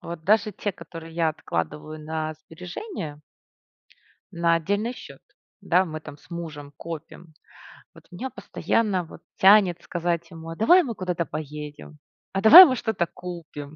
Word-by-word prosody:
Вот 170 Hz, -2 st, -8 dB
даже 215 Hz, +1 st, +3 dB
те, 205 Hz, -, -3 dB
которые 165 Hz, -1 st, -11 dB
я 165 Hz, -1 st, +1 dB
откладываю 150 Hz, -, -4 dB
на 155 Hz, 0 st, -4 dB
сбережения 160 Hz, -, -8 dB, 1.1 s
на 170 Hz, 0 st, +2 dB
отдельный 205 Hz, +8 st, -2 dB
счет, -, -, -12 dB, 0.4 s
да, 180 Hz, +2 st, +2 dB
мы 155 Hz, -3 st, -7 dB
там 145 Hz, -, -11 dB
с 150 Hz, +3 st, -24 dB
мужем 150 Hz, -4 st, -7 dB
копим, 165 Hz, 0 st, -9 dB, 0.6 s
вот -, -, -18 dB
меня 250 Hz, +9 st, -6 dB
постоянно 205 Hz, -6 st, -1 dB
вот -, -, -14 dB, 0.2 s
тянет 190 Hz, -3 st, +5 dB
сказать 170 Hz, -1 st, -3 dB
ему: 165 Hz, -1 st, -10 dB
"А 165 Hz, -, -6 dB
давай 345 Hz, -, +5 dB
мы 240 Hz, -6 st, -5 dB
куда-то 180 Hz, -3 st, -2 dB
поедем? 150 Hz, 0 st, -8 dB, 0.3 s
А 195 Hz, -, -1 dB
давай 320 Hz, -, +12 dB
мы 260 Hz, -, +1 dB
что-то 220 Hz, -7 st, -1 dB
купим? 160 Hz, -5 st, -9 dB
170 Hz, 150 wpm, -24 LUFS, 155-195 Hz, 1.1 s, давай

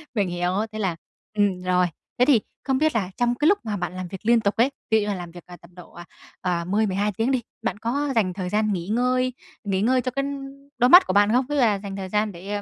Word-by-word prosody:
mình 200 Hz, -3 st, +1 dB
hiểu, 175 Hz, 0 st, -1 dB, 0.2 s
thế 215 Hz, -, -6 dB
là 190 Hz, -5 st, -1 dB, 0.4 s
ừm, 195 Hz, -3 st, +1 dB
rồi. 180 Hz, 0 st, +2 dB, 0.3 s
Thế 250 Hz, -, +6 dB
thì 260 Hz, -6 st, +4 dB, 0.2 s
không 265 Hz, 0 st, +1 dB
biết 310 Hz, -1 st, +1 dB
là 195 Hz, -4 st, -1 dB
trong 240 Hz, 0 st, +1 dB
cái 295 Hz, +4 st, +1 dB
lúc 405 Hz, +3 st, +4 dB
mà 210 Hz, -2 st, -2 dB
bạn 180 Hz, 0 st, -4 dB
làm 185 Hz, -1 st, -5 dB
việc 190 Hz, +2 st, -9 dB
liên 235 Hz, +1 st, +5 dB
tục 200 Hz, -1 st, 0 dB
ấy, 245 Hz, +5 st, +3 dB, 0.2 s
ví 220 Hz, -, +5 dB
dụ -, -, +2 dB
như -, -, -4 dB
là 205 Hz, -, -1 dB
làm 175 Hz, -2 st, -7 dB
việc 175 Hz, 0 st, -12 dB, 0.2 s
tầm 175 Hz, +1 st, -18 dB
độ 180 Hz, -, -14 dB, 0.5 s
à 175 Hz, -2 st, -1 dB
10, 210 Hz, +4 st, +1 dB
12 200 Hz, +2 st, 0 dB
tiếng 230 Hz, +4 st, +1 dB
đi, 255 Hz, -2 st, +1 dB, 0.2 s
bạn 225 Hz, -4 st, -2 dB
có 275 Hz, +7 st, -2 dB
dành 195 Hz, -5 st, +1 dB
thời 180 Hz, -1 st, -4 dB
gian 215 Hz, 0 st, +1 dB
nghỉ 175 Hz, -1 st, -4 dB
ngơi 255 Hz, +3 st, +1 dB, 0.3 s
nghỉ 195 Hz, -2 st, -1 dB
ngơi 255 Hz, +3 st, +3 dB
cho 255 Hz, +1 st, -3 dB
cái 275 Hz, +2 st, -1 dB, 0.5 s
đôi 245 Hz, 0 st, +4 dB
mắt 360 Hz, +5 st, +9 dB
của -, -, 0 dB
bạn 205 Hz, +2 st, +4 dB
không? 250 Hz, +2 st, +2 dB
Ví 295 Hz, -, -1 dB
dụ -, -, +1 dB
là 210 Hz, -4 st, +3 dB
dành 195 Hz, -1 st, -7 dB
thời 190 Hz, -1 st, -5 dB
gian 210 Hz, +1 st, 0 dB
để, 180 Hz, +3 st, -10 dB
a, 205 Hz, -, -3 dB
210 Hz, 275 wpm, -24 LUFS, 185-245 Hz, 0.5 s, mắt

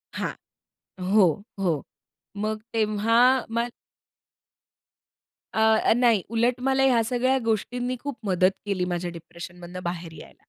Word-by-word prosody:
हां. -, -, -2 dB, 0.8 s
हो, 205 Hz, -4 st, +7 dB, 0.3 s
हो. 170 Hz, -7 st, 0 dB, 0.6 s
मग 215 Hz, 0 st, -2 dB
तेव्हा 220 Hz, +1 st, +2 dB, 0.3 s
मग 235 Hz, +1 st, 0 dB, 1.8 s
अ, 220 Hz, 0 st, +4 dB
नाही 235 Hz, -5 st, +4 dB
उलट 235 Hz, +2 st, +1 dB
मला 270 Hz, +1 st, +2 dB
ह्या 250 Hz, -4 st, +4 dB
सगळ्या 255 Hz, +3 st, +1 dB
गोष्टींनी 245 Hz, +3 st, -1 dB
खूप 285 Hz, -2 st, -5 dB
मदत 185 Hz, 0 st, +3 dB
केली, 190 Hz, -3 st, -1 dB
माझ्या 175 Hz, 0 st, -3 dB
डिप्रेशनमधनं 175 Hz, +1 st, -9 dB
बाहेर 175 Hz, -1 st, -4 dB
यायला. -, -, -16 dB
220 Hz, 115 wpm, -25 LUFS, 180-240 Hz, 1.8 s, हो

